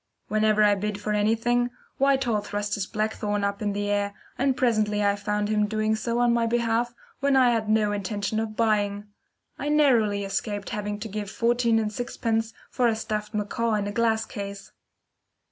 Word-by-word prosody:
Whenever 215 0 +3
I 205 -1 +5
bid 205 +1 -2
for 210 +1 -2
anything, 230 +3 +2 0.3
Whitehall 265 -6 +2
thrust 205 0 -3
his 195 -2 -2
black 215 +1 -1
thorn 205 -1 -2
up 200 +1 -1
into 205 -1 -1
the 205 0 -1
air, 205 0 0 0.2
and 265 0 +1
presently 215 -4 +2
I 200 0 +3
found 210 0 -1
him 210 -1 +1
doing 215 0 0
so 235 +2 -2
on 240 -1 +3
my 235 -1 +2
behalf 235 0 0 0.2
when 280 -1 +2
I 255 -2 +5
had 220 -2 -1
no 215 -1 +3
intention 205 +1 -2
of 220 -1 -3
buying. 205 -3 +1 0.6
I 290 - -2
narrowly 235 -9 +3
escaped 205 +1 -3
having 210 0 -3
to 225 - -4
give 205 -1 -5
fourteen 235 +2 +2
and 215 -1 -1
sixpence 225 -1 -1 0.2
for 250 -2 +2
a 225 - +2
stuffed 215 -1 -4
macaw 220 +2 0
in 205 -1 -1
a 205 - -3
glass 220 0 +1
case. 200 -3 -7
215 Hz, 185 wpm, -26 LUFS, 205-230 Hz, 0.6 s, I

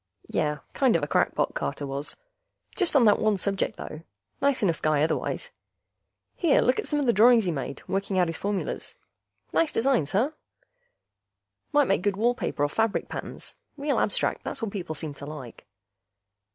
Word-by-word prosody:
Yeh, 150 0 0 0.2
kind 265 -7 +3
of 165 - +1
a - - 0
crackpot, - - +1
Carter 70 - -3
was. 140 +2 -4 0.6
Just 360 -5 +2
on 255 -4 +6
that 210 - +5
one 215 -2 +2
subject, 195 0 -1
though; 155 - -7 0.4
nice 280 -4 +2
enough 170 -6 +1
guy 150 -1 +2
otherwise. 165 - -2 0.8
Here, 330 -5 +3
look 250 - +2
at - - -3
some 295 - 0
of 285 - 0
the 235 - +4
drawings 230 +2 +6
he 175 - +1
made, 140 -2 -5
working 195 0 -1
out 180 - +4
his 165 -1 -4
formulas. 200 +1 -3 0.6
Nice 330 -2 +2
designs, 240 - +1
huh? 240 +10 +2 1.4
Might 290 -2 +4
make 195 - +2
good 200 0 0
wall 235 +3 +3
paper 245 - -2
or - - +4
fabric 225 +6 0
patterns. - - -7 0.2
Real 285 0 0
abstract... - - 0
that's - - -4
what 225 -3 -3
people 175 -6 -4
seem 150 0 -6
to 140 - -10
like. 145 -9 -9
200 Hz, 180 wpm, -26 LUFS, 155-250 Hz, 1.4 s, on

